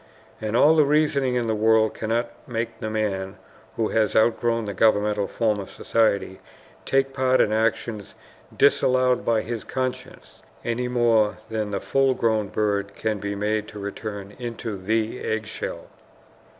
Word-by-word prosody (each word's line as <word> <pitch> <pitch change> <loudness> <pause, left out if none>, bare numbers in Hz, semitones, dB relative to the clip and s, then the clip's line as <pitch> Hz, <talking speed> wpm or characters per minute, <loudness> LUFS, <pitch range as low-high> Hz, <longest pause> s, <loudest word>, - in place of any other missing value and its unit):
And 110 +1 -1
all 155 +5 +6
the 155 - +6
reasoning 140 -3 +2
in 120 -1 0
the 110 - 0
world 110 0 +3
cannot 115 +2 -2 0.2
make 115 -1 -4
the 110 - -3
man 100 -3 -2 0.4
who 110 -2 0
has 110 -2 +1
outgrown 115 0 +2
the 100 - -4
governmental 105 0 +2
form 110 -3 0
of 95 - -7
society 100 -4 0 0.5
take 135 0 +1
part 130 -1 +2
in 105 - +3
actions 110 -1 -1 0.4
disallowed 130 -1 +3
by 115 -2 +2
his 115 -1 -5
conscience, 130 -1 -5 0.2
any 120 +1 -1
more 115 -4 +2
than 110 -2 -2
the 100 -1 -2
full 135 +3 +1
grown 110 -3 +1
bird 100 -1 -1
can 110 -2 -2
be 100 +1 -3
made 105 +1 -1
to 105 - -10
return 100 0 -6
into 115 -3 -5
the 110 +5 -1
egg 110 0 -2
shell. 110 - -6
110 Hz, 155 wpm, -24 LUFS, 105-120 Hz, 0.5 s, all